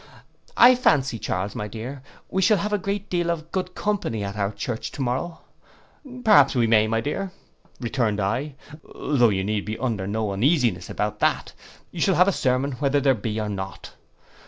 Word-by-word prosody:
—'I 245 +2 +9
fancy, 135 - +2
Charles, 95 +1 -3
my 105 - -4
dear, 120 +6 -7 0.3
we 190 - -1
shall 210 +2 +4
have 210 +1 -2
a 205 - +2
great 200 +2 -3
deal 175 -1 -1
of 165 -1 -3
good 185 -1 -3
company 185 - -2
at 100 0 -5
our 100 -1 -1
church 110 +2 -4
to - - -5
morrow,'—'Perhaps 175 - 0
we 120 -2 +3
may, 110 -1 +4
my 115 +1 0
dear,' 185 +8 -3 0.5
returned 115 -4 -1
I; 130 +9 -2 0.4
'though 125 -5 +2
you 95 -2 0
need 105 0 -1
be 110 +1 -5
under 110 -6 -2
no 105 0 -1
uneasiness 120 - +1
about - - -3
that, - - 0 0.4
you 170 - -6
shall 190 +1 +3
have 180 +2 +5
a - - +4
sermon 130 -3 0
whether 145 0 +2
there 135 -1 +3
be 110 -1 -3
or 105 - -2
not. 95 -1 -6
130 Hz, 180 wpm, -24 LUFS, 110-175 Hz, 0.5 s, I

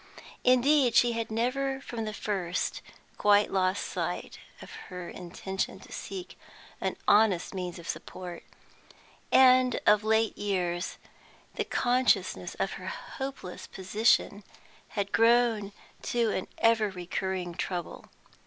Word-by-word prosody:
Indeed, 255 0 +4
she 240 +1 +5
had 230 -1 -3
never 265 +4 -1
from 235 -4 -5
the 215 - -3
first 185 -4 -2 0.4
quite 205 0 +4
lost 185 0 +1
sight - - -4 0.2
of - - -11 0.2
her 180 -2 -7
intention 190 +2 -4
to - - -15
seek 370 -2 -7 0.4
for - - -5
an - - -1
honest 205 -4 +4
means 180 -2 -4
of 170 - -10
support; 180 -2 -6 0.9
and 255 -1 +6
of 210 0 +5
late 220 0 +2
years 180 -3 -2 0.6
the - - -2
consciousness 250 +1 +1
of - - -1
her - - -7
hopeless 270 - -6
position 205 +1 +1 0.5
had 200 0 -1
grown 230 -3 +3 0.3
to 235 -2 0
an 185 - -2
ever 225 -2 +3
recurring 185 -1 -3
trouble. 175 0 -4
210 Hz, 125 wpm, -29 LUFS, 185-240 Hz, 0.9 s, and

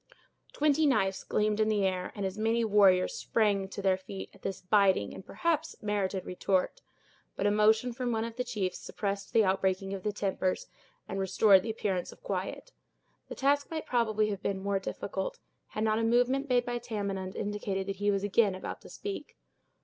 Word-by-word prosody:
Twenty 300 +1 +3
knives 195 -8 +1
gleamed 210 0 0
in 215 0 +3
the 205 -2 +2
air, 185 -1 -1
and 200 -2 -3
as 190 0 -3
many 225 +2 +1
warriors 195 -4 +4
sprang 205 -3 +1
to 200 - -6
their 190 -1 +3
feet, 190 +1 -8
at 195 - -19
this 195 - -4
biting, 190 - +3
and - - -9
perhaps 325 - -1
merited 200 -2 -1
retort; 190 - 0 0.5
but 195 - -2
a 205 - +4
motion 220 +3 +3
from 250 0 -2
one 225 -1 0
of 230 0 -5
the 250 - -1
chiefs 210 -7 -3
suppressed 200 -1 -4
the 225 - +5
outbreaking 190 0 0
of 195 - -4
their 210 - -1
tempers, 190 -2 -1 0.4
and 195 - -4
restored 195 +1 +5
the 225 - -5
appearance 195 -5 -2
of - - -17
quiet. - - -4 0.6
The - - -6
task 285 +1 +2
might 320 -1 -4
probably 215 -3 +1
have 200 -1 -4
been 195 -1 -1
more 200 -1 +1
difficult, - - -4 0.3
had 215 - -3
not 215 0 +2
a - - 0
movement 245 +4 +2
made 245 -1 +3
by 240 0 -2
Tamenund 200 -5 -4
indicated 200 -2 -2
that 195 0 -4
he 205 +1 +1
was 200 -1 +1
again 205 -1 +3
about 185 - -6
to - - -13
speak. 405 -1 -6
205 Hz, 195 wpm, -30 LUFS, 195-230 Hz, 0.6 s, the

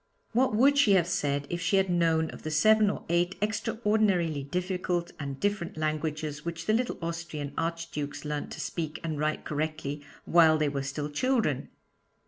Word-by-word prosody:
What 245 -1 +2
would 280 +5 +5
she 215 -8 +5
have 180 -3 +4
said 145 -4 0
if 175 0 -2
she 175 +3 +2
had 195 0 +3
known 165 -2 +2
of - - -10
the 155 - -4
seven 215 +7 +5
or - - -4
eight 175 +2 +1
extraordinarily 210 -7 +1
difficult 180 +2 -2
and 140 -2 -5
different 200 -5 -1
languages 155 -1 -2
which 165 -1 -5
the 215 - +2
little 245 +2 0
Austrian 165 -4 -4
Archdukes 165 -3 -3
learnt 150 0 -3
to - - -8
speak 155 +1 -4
and 155 -3 -3
write 155 +1 -1
correctly 150 -1 -3 0.2
while 160 -2 +6
they 155 -1 +1
were 140 -1 -2
still 140 +2 -3
children? 225 - 0
165 Hz, 170 wpm, -28 LUFS, 150-195 Hz, 0.2 s, while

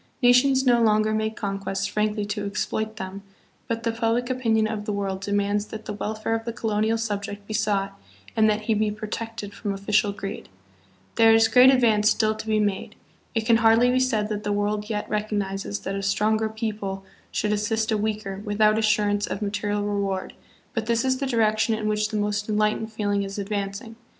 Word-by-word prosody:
Nations 260 +2 +5
no 240 -2 +4
longer 215 -1 +3
make 220 0 -1
conquests 195 -1 -3
frankly 210 0 -1
to 205 0 -3
exploit 215 +2 -2
them, 195 -1 -6 0.5
but 230 0 -2
the 230 - +1
public 230 +2 0
opinion 225 -4 +1
of 215 -1 -4
the 210 - -2
world 195 -2 -2
demands 205 +1 0
that 220 0 -8
the - - -4
welfare 215 +2 -3
of 225 0 -1
the 235 - -3
co 225 -1 -3
lonial 215 +2 +1
subject 205 -2 -4
be 215 - -6
sought 200 -2 -1 0.3
and 220 -1 +4
that 210 0 0
he 220 +1 0
be 215 0 +1
protected 215 0 -6
from 205 0 -4
official 200 +1 +1
greed. 200 0 -7 0.7
'There 225 -1 +7
is 225 0 +5
great 250 +2 +7
advance 225 -5 +4
still 215 -1 +2
to 220 0 -8
be 215 -1 +2
made. 205 -2 -1 0.4
It 225 -1 0
can 230 -1 +5
hardly 230 +2 +5
be 255 - +2
said 220 -5 +1
that 210 -1 -3
the 205 - -1
world 205 +1 -1
yet 210 -1 -2
recognizes 205 -1 -2
that 195 - -4
a 195 - -3
stronger 215 +2 +1
people 210 -3 -4 0.2
should 210 0 -1
assist 220 +1 0
a - - +3
weaker 210 -2 -3
without 215 0 +3
assurance 210 -1 +1
of - - -4
material 205 0 -1
reward, 200 -2 -2 0.4
but 225 -4 -2
this 235 +1 +1
is 260 0 +1
the 275 - -1
direction 225 -2 +2
in 215 -1 -3
which 210 0 0
the 215 - -2
most 205 0 -1
enlightened 215 +1 0
feeling 205 -2 -1
is 195 0 -5
advancing. 200 +2 -4
215 Hz, 195 wpm, -24 LUFS, 205-225 Hz, 0.7 s, There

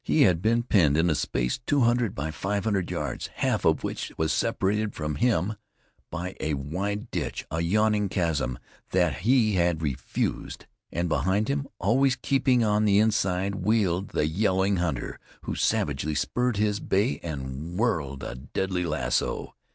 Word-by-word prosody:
He 155 - +4
had 90 -4 +3
been 115 +3 +2
penned 80 - +3
in 85 +1 +3
a - - +3
space 60 -4 -1
two 140 +3 +1
hundred 120 -3 +2
by 75 +3 -3
five 100 +6 -2
hundred 100 -5 0
yards, - - -3
half - - 0
of - - +3
which - - -4
was 80 -1 +1
separated 105 +2 0
from 75 -1 -3
him 110 0 +1 0.6
by 90 +3 -5
a 75 -2 -1
wide 100 +10 -3
ditch, 80 -7 -3
a 80 +1 -1
yawning 105 +3 +2
chasm 80 -10 0 0.4
that 90 -1 +2
he 110 +2 +3
had 85 -2 +1
refused, 70 -4 -3 0.3
and 85 +1 -1
behind 95 - +1
him, 140 0 -1
always 125 +7 +3
keeping 130 -4 +2
on 105 0 +2
the 100 -1 +4
inside, 100 -3 +2
wheeled 100 -2 +1
the - - 0
yelling 95 +3 +1
hunter, 85 -8 -2 0.2
who - - -3
savagely 75 +2 0
spurred 125 - 0
his 105 -1 +1
bay 105 +8 +1
and 75 +2 -5
whirled 75 - -1
a - - -4
deadly 90 +8 -2
lasso. 75 -7 -1
95 Hz, 160 wpm, -26 LUFS, 80-110 Hz, 0.6 s, He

